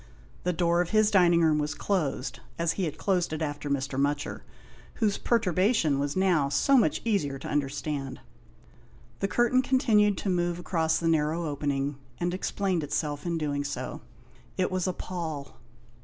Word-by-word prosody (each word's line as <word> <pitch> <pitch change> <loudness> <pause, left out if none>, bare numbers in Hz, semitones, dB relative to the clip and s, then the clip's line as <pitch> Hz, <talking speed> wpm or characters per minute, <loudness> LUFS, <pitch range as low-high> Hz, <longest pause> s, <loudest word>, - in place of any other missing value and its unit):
The 180 - +2
door 170 0 +2
of 175 - -2
his 215 -1 +3
dining 175 -3 +5
room 155 -1 +3
was 150 0 -2
closed, 155 -9 -2 0.2
as 170 -1 +1
he 190 - -1
had 155 - -4
closed 180 -5 0
it 155 +1 -2
after 145 -1 -4
Mr. 135 -1 -1
Mutcher, 145 +1 -1 0.5
whose 215 -3 0
perturbation 185 - +2
was 140 0 -1
now 180 -7 +2
so 275 - +3
much 220 - +3
easier 175 -12 0
to 135 - -8
understand. 140 -1 -2 1.0
The 195 - 0
curtain 240 +6 +3
continued 220 -6 +3
to - - -4
move 175 -1 0
across 165 -2 0
the 170 - -1
narrow 160 +1 +1
opening, 145 -1 -2 0.2
and 175 0 -1
explained 185 -2 -1
itself 145 +1 -2
in 170 -1 0
doing 145 -2 -1
so. 140 -2 -5 0.6
It 185 -1 +1
was 185 0 -1
a 185 - 0
pall. 160 -7 -6
165 Hz, 165 wpm, -28 LUFS, 145-185 Hz, 1.0 s, dining